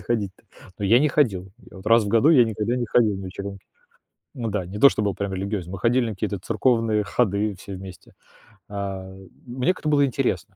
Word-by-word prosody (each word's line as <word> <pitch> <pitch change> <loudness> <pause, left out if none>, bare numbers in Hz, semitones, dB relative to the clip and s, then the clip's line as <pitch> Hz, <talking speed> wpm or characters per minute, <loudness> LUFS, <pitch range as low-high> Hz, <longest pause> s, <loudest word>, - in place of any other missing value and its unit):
ходить-то? 105 -5 -3 0.4
Ну 100 - -3
я 115 +5 +5
и - - +5
не 150 - +3
ходил: 95 -11 0 0.2
я - - -14
вот 95 - -12
раз 115 0 +5
в 100 - -3
году 115 +9 +4
я 130 -7 +7
никогда 110 +2 -2
не 120 - -2
ходил 110 -3 +3
на 95 - -7
вечеринки. 100 +1 -7 0.7
Ну 115 - -2
да, 100 -4 -2
не 100 +3 -7
то, 140 - +8
что - - -2
был 100 -2 0
прям 100 -1 -4
религиозен, 95 -1 -4
мы 95 - -5
ходили 120 +3 +2
на - - -4
какие-то 100 0 -3
церковные 115 +1 +1
ходы 100 -1 0
все 100 0 -8
вместе. 95 -1 -11 0.6
Э, 95 -1 -6 0.2
мне 130 +9 0
как-то 155 - -3
было 145 -1 +4
интересно. 125 - -1
105 Hz, 215 wpm, -23 LUFS, 95-120 Hz, 0.7 s, то